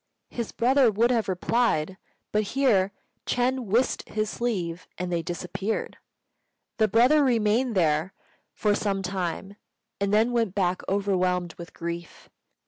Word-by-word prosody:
His 235 -2 -4
brother 255 +1 +4
would 225 +4 +2
have 230 -5 +1
replied; 190 -3 +1 0.4
but 210 - +2 0.2
here 205 -8 +3 0.4
Ch'êng 250 +1 0
whisked 230 +6 0
his 215 0 -1
sleeve, 185 -8 -3
and 180 0 -3
they 170 - +1
disappeared. 180 +5 -4 0.8
The 220 - +4
brother 250 +8 +5
remained 235 -1 +2
there 160 0 +1 0.4
for 210 -1 +1
some 195 -2 -1
time, 190 +1 -4 0.4
and 200 0 0
then 220 +3 +3
went 230 -6 0
back 185 -2 +1
overwhelmed 185 -3 0
with 170 0 -11
grief. 170 -1 -6
205 Hz, 135 wpm, -26 LUFS, 180-235 Hz, 0.8 s, brother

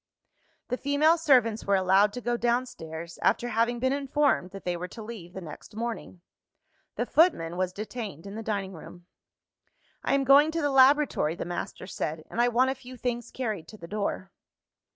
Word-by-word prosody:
The 250 - -1
female 285 +4 +3
servants 255 -9 +3
were 200 - +2
allowed 190 +2 +4
to 245 - -5
go 240 0 0
downstairs; 170 -10 -3
after 240 - +2
having 235 +1 +1
been 260 +2 +1
informed 280 -7 +1
that 195 +1 -10
they 180 -1 0
were 175 +1 -5
to 220 +4 -9
leave 210 -6 -9
the 190 - -7
next 170 +5 -11
morning. 225 -5 -5 0.7
The - - -1
footman 240 - +3
was 185 0 -1
detained 210 - -6
in 200 - -7
the 220 - -5
dining 200 -3 -3
room. 175 +1 -12 1.0
"I - - +2
am 275 - +2
going 280 +3 +6
to 330 - -1
the 290 - +1
laboratory," 270 - +4
the - - -5
master 175 +1 -5
said; 155 -4 -4
"and 235 - 0
I 240 - +4
want 250 +2 +3
a - - -1
few 255 -1 -12
things 240 -1 -3
carried 215 -10 -4
to 215 - -12
the 170 - -10
door." 200 -1 -3
225 Hz, 190 wpm, -27 LUFS, 185-260 Hz, 1.0 s, going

